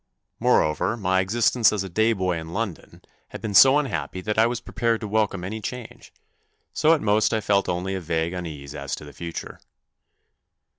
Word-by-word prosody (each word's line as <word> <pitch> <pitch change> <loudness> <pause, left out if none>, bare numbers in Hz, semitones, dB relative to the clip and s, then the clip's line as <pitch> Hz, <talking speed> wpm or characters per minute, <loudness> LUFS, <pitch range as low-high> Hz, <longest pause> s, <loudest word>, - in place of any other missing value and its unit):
Moreover, 80 +9 +2
my 95 -3 +1
existence 115 +3 +3
as 105 -2 -2
a - - -5
day 110 +5 +2
boy 90 -4 -1
in 80 +1 -9
London 105 -6 -5 0.2
had - - -9
been 105 -2 -4
so 135 +8 +8
unhappy 95 - -2
that 105 +3 -1
I 115 - +5
was 120 -1 -2
prepared 115 -1 -1
to 110 - -4
welcome 105 -3 0
any 110 +4 -5
change, 125 +3 -8 0.6
so 160 +2 +4
at 155 - -4
most 105 0 +2
I - - +1
felt 100 -2 +1
only 90 +2 -2
a 95 - -3
vague 80 +1 -1
unease 75 -6 -7
as 70 -1 -4
to - - -11
the 70 - -12
future. 85 +2 -7
100 Hz, 190 wpm, -24 LUFS, 85-110 Hz, 0.6 s, so